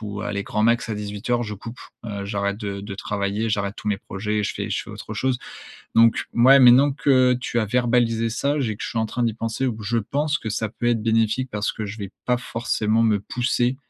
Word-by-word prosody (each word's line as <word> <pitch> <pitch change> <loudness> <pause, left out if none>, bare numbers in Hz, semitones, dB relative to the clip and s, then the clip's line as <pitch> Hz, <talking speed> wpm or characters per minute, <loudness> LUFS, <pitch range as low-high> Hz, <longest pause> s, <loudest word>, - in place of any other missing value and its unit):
ou, 105 -1 -5
allez, 100 -1 -3
grand 105 +1 -1
max 115 +1 +2
à 110 - -2
18:00, 105 +4 -2
je 105 -1 -5
coupe, 115 +4 -9 0.3
heu, 100 -2 -5
j'arrête 100 0 -2
de 100 -2 -4
de 100 0 -7
travailler, 100 +2 -2
j'arrête 100 -1 -1
tous - - -10
mes 105 - +1
projets, 105 +2 -3
et 105 - +1
je - - -1
fais - - -4
je - - -1
fais - - -11
autre 110 - -8
chose». 130 +3 0 0.6
Donc, 115 0 +5
mouais, 130 +4 +7
maintenant 130 +2 +7
que 130 -2 +3
tu 125 -1 -2
as 110 - 0
verbalisé, 115 -1 +1
ça, 140 +6 0
j'ai 115 -6 -1
que - - -8
je - - -3
suis 115 - -3
en 110 - +2
train 120 +3 -3
d'y 115 -2 +1
penser, 115 +3 -2
ou 110 -4 -3
je 115 +3 0
pense 145 +7 -1
que 110 - -6
ça 110 0 -2
peut 120 - -4
être 115 -2 +2
bénéfique 115 +3 +1
parce 105 0 -1
que 110 - -5
je 105 +2 -7
vais 100 -1 -6
pas 125 -1 +1
forcément 115 -2 0
me 110 -3 +2
pousser 125 +3 0
115 Hz, 240 wpm, -23 LUFS, 105-120 Hz, 0.6 s, mouais